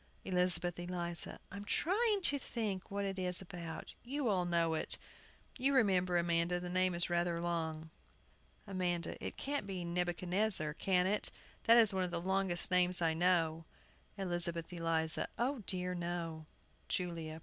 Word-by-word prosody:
] -, -, -32 dB
ELIZABETH 180 Hz, -1 st, +2 dB
ELIZA. 175 Hz, -1 st, -4 dB
I'm 200 Hz, +1 st, -6 dB
trying 405 Hz, -, +1 dB
to 285 Hz, -4 st, +3 dB
think 210 Hz, -7 st, -3 dB
what 200 Hz, 0 st, -2 dB
it 195 Hz, -1 st, -3 dB
is 180 Hz, -1 st, 0 dB
about. 170 Hz, -3 st, -7 dB
You 265 Hz, 0 st, -1 dB
all 185 Hz, -3 st, +2 dB
know 170 Hz, -2 st, +2 dB
it. 160 Hz, -, -3 dB, 0.6 s
You 275 Hz, +2 st, +3 dB
remember, 185 Hz, -7 st, +3 dB
Amanda, 170 Hz, +1 st, +1 dB
the 175 Hz, 0 st, -5 dB
name 185 Hz, 0 st, +2 dB
is 170 Hz, -, +1 dB
rather 175 Hz, -1 st, 0 dB
long. 160 Hz, -2 st, -2 dB, 0.7 s
AMANDA. 180 Hz, -3 st, -2 dB
It -, -, -5 dB
can't 280 Hz, -7 st, -2 dB
be 185 Hz, -3 st, -4 dB
Nebuchadnezzar, 175 Hz, 0 st, 0 dB
can 180 Hz, +2 st, +2 dB
it? 205 Hz, +2 st, +2 dB, 0.4 s
that 230 Hz, +1 st, +7 dB
is 220 Hz, -4 st, +6 dB
one 190 Hz, -1 st, +1 dB
of 180 Hz, -, -1 dB
the 175 Hz, -, -2 dB
longest 190 Hz, 0 st, 0 dB
names 180 Hz, 0 st, +4 dB
I 165 Hz, -2 st, +2 dB
know. 165 Hz, -1 st, +2 dB, 0.5 s
ELIZABETH 175 Hz, -2 st, 0 dB
ELIZA. 165 Hz, -2 st, +1 dB
O 255 Hz, +3 st, 0 dB
dear, 180 Hz, -1 st, +1 dB
no! 170 Hz, -3 st, -4 dB, 0.4 s
JULIA. 165 Hz, -3 st, -3 dB
180 Hz, 155 wpm, -35 LUFS, 170-195 Hz, 0.7 s, that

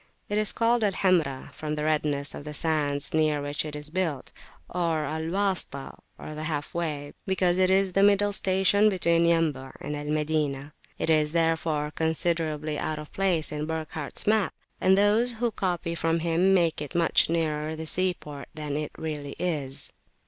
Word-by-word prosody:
It 205 Hz, +1 st, +1 dB
is 215 Hz, -, +1 dB
called 230 Hz, 0 st, +2 dB
Al 200 Hz, -2 st, +2 dB
Hamra, 165 Hz, -9 st, +1 dB
from 155 Hz, -1 st, -4 dB
the 150 Hz, -, -3 dB
redness 150 Hz, -2 st, 0 dB
of -, -, -7 dB
the 150 Hz, 0 st, -6 dB
sands 145 Hz, -2 st, 0 dB
near 155 Hz, -2 st, +2 dB
which 145 Hz, +1 st, -1 dB
it 150 Hz, -1 st, -6 dB
is 150 Hz, 0 st, -7 dB
built, 165 Hz, -7 st, -2 dB, 0.4 s
or 165 Hz, -3 st, 0 dB
Al 160 Hz, +2 st, -3 dB
Wasitah, 190 Hz, -7 st, -2 dB, 0.2 s
the 155 Hz, 0 st, -7 dB
"half 150 Hz, -2 st, -3 dB
way," 150 Hz, -4 st, -3 dB
because 185 Hz, -1 st, +2 dB
it 185 Hz, 0 st, +4 dB
is 190 Hz, -1 st, +3 dB
the 195 Hz, -, +3 dB
middle 205 Hz, 0 st, +5 dB
station 195 Hz, +2 st, +3 dB
between 170 Hz, -3 st, +2 dB
Yambu' 155 Hz, -6 st, +1 dB
and 150 Hz, -, -4 dB
Al 145 Hz, 0 st, -5 dB
Madinah. 150 Hz, -2 st, -1 dB, 0.2 s
It 160 Hz, -, +1 dB
is 155 Hz, -1 st, +3 dB
therefore 160 Hz, -2 st, +1 dB
considerably 160 Hz, -2 st, -1 dB
out 155 Hz, -1 st, -2 dB
of 150 Hz, 0 st, -9 dB
place 185 Hz, -5 st, +1 dB
in 150 Hz, 0 st, -3 dB
Burckhardt's 160 Hz, -2 st, -4 dB
map; 215 Hz, -1 st, +2 dB, 0.3 s
and 190 Hz, +1 st, +5 dB
those 215 Hz, +4 st, +4 dB
who 235 Hz, +1 st, -1 dB
copy 175 Hz, -4 st, -2 dB
from 165 Hz, 0 st, 0 dB
him 170 Hz, +3 st, +2 dB
make 170 Hz, -5 st, +2 dB
it 150 Hz, +3 st, -6 dB
much 170 Hz, -2 st, +3 dB
nearer 155 Hz, -2 st, -1 dB
the 160 Hz, 0 st, -6 dB
sea 185 Hz, +3 st, 0 dB
port 145 Hz, -2 st, -9 dB
than 150 Hz, -2 st, -4 dB
it 150 Hz, 0 st, -3 dB
really 150 Hz, -3 st, -5 dB
is. 145 Hz, -7 st, -3 dB
160 Hz, 180 wpm, -27 LUFS, 150-185 Hz, 0.4 s, middle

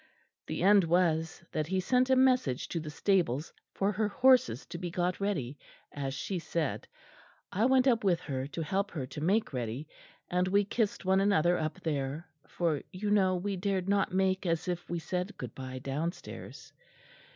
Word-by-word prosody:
The -, -, -3 dB
end 200 Hz, 0 st, +6 dB
was 165 Hz, -1 st, +1 dB
that 155 Hz, -1 st, -1 dB
he 190 Hz, +2 st, 0 dB
sent 250 Hz, +7 st, +2 dB
a 260 Hz, -, +5 dB
message 255 Hz, -, +3 dB
to 170 Hz, -, -2 dB
the 155 Hz, -1 st, -6 dB
stables 160 Hz, -4 st, 0 dB, 0.2 s
for 200 Hz, +1 st, 0 dB
her 210 Hz, +1 st, 0 dB
horses 245 Hz, -, +3 dB
to 170 Hz, -1 st, -7 dB
be 175 Hz, -1 st, -3 dB
got 175 Hz, +1 st, -1 dB
ready, 150 Hz, -10 st, -2 dB, 0.3 s
as 135 Hz, -1 st, -4 dB
she 185 Hz, +5 st, -3 dB
said. 165 Hz, -3 st, -2 dB, 0.6 s
I 210 Hz, +5 st, +1 dB
went 260 Hz, -1 st, +4 dB
up 235 Hz, -4 st, +3 dB
with 180 Hz, -4 st, +3 dB
her 135 Hz, -2 st, -3 dB
to 160 Hz, +3 st, -4 dB
help 195 Hz, +6 st, -1 dB
her 145 Hz, -9 st, -4 dB
to 150 Hz, -, -8 dB
make 195 Hz, +2 st, +1 dB
ready, 125 Hz, +4 st, -3 dB, 0.4 s
and 180 Hz, +1 st, +1 dB
we 200 Hz, +2 st, +3 dB
kissed 210 Hz, -2 st, -1 dB
one 190 Hz, +1 st, +4 dB
another 175 Hz, -3 st, +3 dB
up 155 Hz, -2 st, -3 dB
there, 145 Hz, +1 st, -2 dB, 0.2 s
for, 165 Hz, -5 st, -1 dB
you 205 Hz, +3 st, -3 dB
know, 190 Hz, -3 st, +4 dB
we 195 Hz, +2 st, -2 dB
dared 190 Hz, 0 st, -1 dB
not 200 Hz, -1 st, +2 dB
make 190 Hz, 0 st, +1 dB
as 165 Hz, 0 st, 0 dB
if 175 Hz, -1 st, -3 dB
we 175 Hz, -, -1 dB
said 180 Hz, +4 st, -3 dB
good 125 Hz, -3 st, -6 dB
bye 130 Hz, -1 st, -7 dB
downstairs. 145 Hz, +7 st, -5 dB
180 Hz, 185 wpm, -30 LUFS, 155-200 Hz, 0.6 s, end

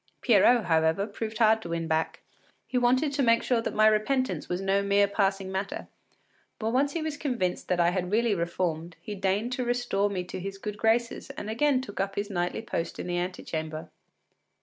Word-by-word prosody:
Pierrot, 235 Hz, 0 st, +5 dB
however, 160 Hz, +3 st, +2 dB
proved 220 Hz, +1 st, -5 dB
hard 220 Hz, 0 st, +4 dB
to 170 Hz, -, -7 dB
win 165 Hz, -1 st, -2 dB
back; 160 Hz, 0 st, -1 dB, 0.4 s
he -, -, -8 dB
wanted 255 Hz, +4 st, +3 dB
to 280 Hz, -, 0 dB
make 230 Hz, -2 st, +4 dB
sure 240 Hz, -3 st, +1 dB
that -, -, -4 dB
my 215 Hz, -, +5 dB
repentance 235 Hz, +5 st, +1 dB
was 180 Hz, -, -1 dB
no 195 Hz, +1 st, +1 dB
mere 200 Hz, 0 st, +3 dB
passing 195 Hz, -1 st, 0 dB
matter, 190 Hz, +1 st, -4 dB, 0.7 s
but 220 Hz, 0 st, -2 dB
once 280 Hz, +3 st, +2 dB
he 330 Hz, -, -2 dB
was 310 Hz, -2 st, -3 dB
convinced 240 Hz, -, -2 dB
that 180 Hz, -1 st, 0 dB
I 170 Hz, 0 st, +4 dB
had 180 Hz, -1 st, -2 dB
really 230 Hz, +1 st, +2 dB
reformed, 170 Hz, -2 st, -2 dB
he 210 Hz, -, -7 dB
deigned 200 Hz, +4 st, 0 dB
to 255 Hz, 0 st, -1 dB
restore 240 Hz, -5 st, 0 dB
me 185 Hz, -3 st, -2 dB
to 180 Hz, -, -7 dB
his 195 Hz, +1 st, -5 dB
good 210 Hz, +1 st, -6 dB
graces 230 Hz, +1 st, +1 dB
and 210 Hz, -, -6 dB
again 260 Hz, +3 st, +2 dB
took 225 Hz, -6 st, -8 dB
up 195 Hz, 0 st, -1 dB
his 205 Hz, +1 st, -3 dB
nightly 175 Hz, +3 st, -2 dB
post 165 Hz, -6 st, -3 dB
in -, -, -5 dB
the 175 Hz, 0 st, -1 dB
antechamber. 160 Hz, -3 st, -4 dB
200 Hz, 200 wpm, -28 LUFS, 180-235 Hz, 0.7 s, Pierrot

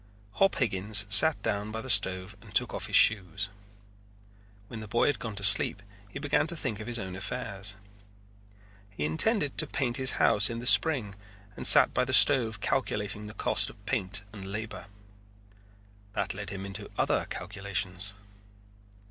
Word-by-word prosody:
Hop 195 Hz, -, +1 dB
Higgins 105 Hz, -3 st, 0 dB
sat 150 Hz, +10 st, +8 dB
down 105 Hz, +1 st, -3 dB
by 110 Hz, -, -5 dB
the 115 Hz, -, -9 dB
stove 95 Hz, -1 st, +2 dB
and -, -, -16 dB
took -, -, +1 dB
off -, -, -5 dB
his -, -, -3 dB
shoes. 100 Hz, -2 st, +3 dB, 1.2 s
When 115 Hz, -, -9 dB
the 110 Hz, -, -9 dB
boy 120 Hz, +3 st, 0 dB
had 145 Hz, -, -1 dB
gone 110 Hz, -3 st, -7 dB
to 100 Hz, -, -3 dB
sleep 100 Hz, 0 st, +3 dB, 0.3 s
he -, -, -9 dB
began 145 Hz, +2 st, -1 dB
to 170 Hz, -, +1 dB
think 120 Hz, -9 st, -5 dB
of 110 Hz, -, -9 dB
his 120 Hz, -1 st, -2 dB
own 95 Hz, -4 st, -7 dB
affairs. 100 Hz, +1 st, -6 dB, 1.1 s
He 95 Hz, -7 st, -5 dB
intended 145 Hz, -, +1 dB
to -, -, +5 dB
paint 125 Hz, -3 st, -2 dB
his 130 Hz, 0 st, +2 dB
house 105 Hz, 0 st, +2 dB
in 115 Hz, -, -6 dB
the 120 Hz, -, -8 dB
spring 130 Hz, -8 st, +2 dB, 0.4 s
and -, -, -1 dB
sat -, -, +7 dB
by -, -, 0 dB
the -, -, -4 dB
stove 115 Hz, -7 st, +4 dB
calculating 105 Hz, -6 st, -3 dB
the 105 Hz, -, -12 dB
cost -, -, 0 dB
of 100 Hz, -, -18 dB
paint 100 Hz, -4 st, -2 dB
and 95 Hz, -2 st, -9 dB
labor. 105 Hz, -1 st, -7 dB, 1.3 s
That -, -, -3 dB
led 105 Hz, 0 st, -8 dB
him 100 Hz, -1 st, -7 dB
into 100 Hz, 0 st, -4 dB
other -, -, -1 dB
calculations. 100 Hz, 0 st, -4 dB
105 Hz, 170 wpm, -27 LUFS, 100-120 Hz, 1.3 s, sat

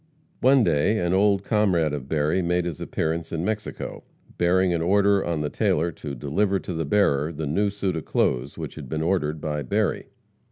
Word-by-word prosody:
One 130 Hz, 0 st, +5 dB
day, 85 Hz, +5 st, +2 dB
an 85 Hz, -2 st, 0 dB
old 100 Hz, 0 st, +3 dB
comrade 95 Hz, -9 st, +2 dB
of 70 Hz, -2 st, -5 dB
Berry 80 Hz, +4 st, +1 dB
made 90 Hz, 0 st, 0 dB
his 85 Hz, -4 st, -5 dB
appearance 80 Hz, +1 st, -2 dB
in 85 Hz, +1 st, -2 dB
Mexico, 105 Hz, 0 st, -4 dB, 0.4 s
bearing 90 Hz, +1 st, +3 dB
an 85 Hz, -, 0 dB
order 100 Hz, +2 st, +3 dB
on 85 Hz, -3 st, -2 dB
the 75 Hz, -, -1 dB
tailor 85 Hz, +3 st, +1 dB
to 70 Hz, -2 st, -7 dB
"deliver 95 Hz, +10 st, 0 dB
to 90 Hz, -, -5 dB
the 80 Hz, -1 st, -2 dB
bearer" 75 Hz, -4 st, +2 dB
the 80 Hz, -1 st, -5 dB
new 100 Hz, +9 st, +1 dB
suit 100 Hz, -3 st, -2 dB
of 80 Hz, -, -4 dB
clothes 65 Hz, +3 st, 0 dB
which -, -, -6 dB
had -, -, -9 dB
been 80 Hz, 0 st, -2 dB
ordered 80 Hz, -3 st, 0 dB
by 75 Hz, -1 st, -3 dB
Berry. 65 Hz, -, -1 dB
85 Hz, 195 wpm, -24 LUFS, 75-100 Hz, 0.4 s, One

